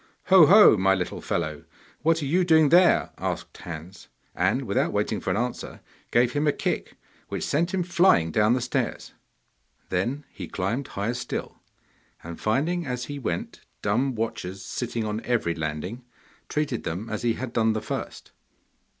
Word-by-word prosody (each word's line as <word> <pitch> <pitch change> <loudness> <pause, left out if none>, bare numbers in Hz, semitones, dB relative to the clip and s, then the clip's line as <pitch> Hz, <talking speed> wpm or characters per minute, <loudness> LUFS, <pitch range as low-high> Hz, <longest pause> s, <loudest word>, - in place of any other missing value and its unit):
'Ho! 185 -5 +8
ho! 205 - +8
my 95 0 +3
little 90 -2 -4
fellow, 80 -3 -3 0.4
what 165 0 +2
are - - -1
you 175 +7 +2
doing 160 -3 +5
there?' 175 +2 +5
asked - - -4
Hans, 85 +3 -9 0.3
and, - - +1
without - - 0
waiting - - -1
for - - -3
an - - +1
answer, 125 +2 -4 0.3
gave 120 +1 +3
him 145 +1 0
a - - +5
kick - - -3 0.3
which - - -4
sent 170 +5 0
him 190 -2 0
flying 170 - +3
down 105 +5 +3
the 125 - 0
stairs. 125 - -3 0.8
Then 120 +11 -1
he 90 - -8
climbed 115 +9 -2
higher 100 +4 -2
still, 125 - -5 0.6
and 85 0 -8
finding 155 +11 0
as 125 -1 -3
he 145 +2 -6
went 90 -10 -4 0.2
dumb 125 +6 +1
watchers 100 -4 -4
sitting 120 -2 -3
on 105 +1 -3
every 115 -9 0
landing, 80 +9 -4 0.5
treated 150 -6 -1
them 90 +8 -4
as 110 -1 -4
he 120 -1 +1
had 125 0 -6
done 110 -1 +2
the 110 - -1
first. - - -6
120 Hz, 165 wpm, -25 LUFS, 95-145 Hz, 0.8 s, Ho